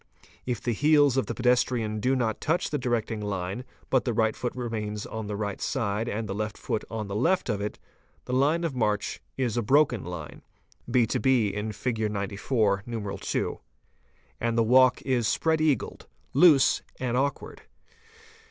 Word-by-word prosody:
If 120 -3 -1
the 120 +1 -2
heels 145 +2 +4
of 135 - 0
the - - -3
pedestrian 120 -3 +1
do 130 +5 +1
not 115 -4 -1
touch 160 +4 0
the 150 - -1
directing 115 -3 -1
line 100 +2 -3 0.3
but 130 - +3
the 120 - -1
right 110 0 +2
foot 125 - -4
remains 105 -4 -4
on 110 -1 -5
the 105 - -3
right 100 -1 -3 0.2
and 110 0 -2
the 95 - -3
left 105 +1 -3
foot 110 - -3
on 110 -2 -4
the 100 - -5
left 165 - +1
of 105 -2 -1
it, 105 - -4 0.5
the 125 - -4
line 145 +6 +2
of 165 -4 -1
march 105 -4 -1 0.2
is 125 -4 -1
a - - +2
broken 125 -2 +3
line 85 -4 -7 0.5
(6 120 -3 +2
bin 110 -4 +1
lig. 110 -4 0
94, 100 0 0 0.5
IL.) - - -2 0.8
and 115 0 0
the 115 - +4
walk 130 +2 +5
is 125 -4 +1
spread 160 +5 +1
eagled, 150 -7 0 0.3
loose, 145 -2 +6 0.2
and 125 -2 -1
awkward. 140 +2 -2
115 Hz, 165 wpm, -27 LUFS, 105-130 Hz, 0.8 s, loose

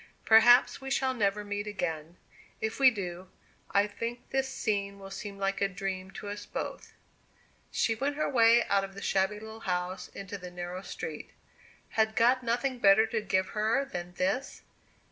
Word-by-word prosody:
Perhaps 235 +4 +6
we 270 - -6
shall 265 -1 +1
never 210 -3 0
meet 205 0 -4
again. 165 -5 -4 0.4
If 220 +3 -3
we 270 -1 +8
do, 185 -5 -6 0.4
I 200 +1 +3
think 230 +3 -6
this 265 0 0
scene 200 -5 -2
will 195 0 -10
seem 200 0 -7
like 195 0 -1
a 200 - +4
dream 190 0 -4
to - - -7
us 205 0 -6
both." - - -6 0.8
She 225 - +1
went 275 +6 -2
her 305 - 0
way 235 -2 +5
out 200 -1 +1
of 195 0 -7
the 200 - -8
shabby 195 +2 +1
little 220 +1 -9
house 180 -2 -3
into 200 0 -8
the 180 -1 -8
narrow 175 +1 -6
street. - - -7 0.6
Had 220 0 +1
God 245 +3 +4
nothing 245 +2 -1
better 200 +1 +6
to 225 -1 -2
give 190 -2 0
her 220 +6 +1
than 180 -7 -6
this? 195 +10 -2
205 Hz, 175 wpm, -30 LUFS, 195-230 Hz, 0.8 s, we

